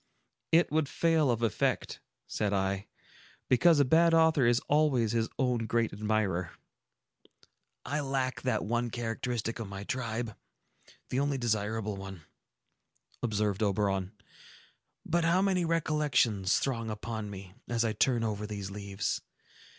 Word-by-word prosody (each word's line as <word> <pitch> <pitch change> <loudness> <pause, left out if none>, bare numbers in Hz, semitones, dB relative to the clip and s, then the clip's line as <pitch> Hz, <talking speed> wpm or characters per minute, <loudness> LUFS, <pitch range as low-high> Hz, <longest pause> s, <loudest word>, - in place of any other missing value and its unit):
"It 165 -1 +4
would 155 -2 +1
fail 160 -4 +2
of 120 -1 0
effect," 110 -5 0 0.3
said 105 -2 -1
I, 95 0 -1 0.6
"because 160 +5 +5
a 140 - +5
bad 165 +5 +5
author 160 -6 +4
is 120 0 +4
always 140 -7 +2
his 115 -1 0
own 125 -4 0
great 115 -1 0
admirer." 100 -4 -1 1.3
"I 145 - -1
lack 135 -2 -1
that 130 - 0
one 120 +2 0
characteristic 115 0 -3
of 115 - -4
my 100 0 -6
tribe,—the 115 +2 -6
only 140 0 0
desirable 110 -3 -1
one," 95 -4 -8 1.0
observed 105 -3 0
Oberon. 100 -1 0 0.9
"But 170 +1 +1
how 170 +2 +3
many 190 -2 +2
recollections 150 - +2
throng 115 -4 -2
upon 110 0 -4
me, 95 -2 -9
as 120 -1 0
I 110 - 0
turn 120 +2 +2
over 105 -1 -2
these 100 -2 -5
leaves! 100 -1 -3
115 Hz, 130 wpm, -30 LUFS, 105-135 Hz, 1.3 s, because